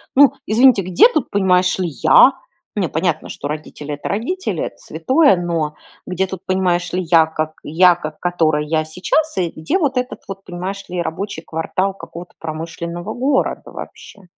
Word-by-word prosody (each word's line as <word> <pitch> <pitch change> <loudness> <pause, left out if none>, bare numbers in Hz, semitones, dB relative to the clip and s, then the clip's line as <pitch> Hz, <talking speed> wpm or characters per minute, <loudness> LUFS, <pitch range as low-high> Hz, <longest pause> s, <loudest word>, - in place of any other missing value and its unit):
Ну, 280 -2 +7
извините, 235 -1 +5
где 185 - +6
тут, 310 - -1
понимаешь 185 -2 +2
ли, 180 - 0 0.2
я? 260 - +7 0.4
Нет, 190 -6 -1
понятно, 160 -1 -1
что 145 - -5
родители- 150 -1 -6
это 145 - -6
родители, 365 - -2
это - - -6
святое, 280 - +3
но 165 -4 -2 0.3
где 185 +1 0
тут, 190 0 -8
понимаешь 185 -2 0
ли, 185 - 0
я, 160 -1 +4
как 155 0 -3
я, 175 +3 +4
как 155 0 -7
которая 160 -4 +1
я 155 +1 0
сейчас, 195 - -1
и 175 -3 0
где 160 - -1
вот 275 -7 0
этот 250 0 -3
вот, 195 0 -7
понимаешь 185 +3 -5
ли, 180 -1 -2
рабочий 170 0 -4
квартал 185 +4 -2
какого-то 175 -2 -10
промышленного 170 +4 -5
города 265 +2 -1
вообще. 205 - -11
180 Hz, 165 wpm, -19 LUFS, 160-200 Hz, 0.4 s, Ну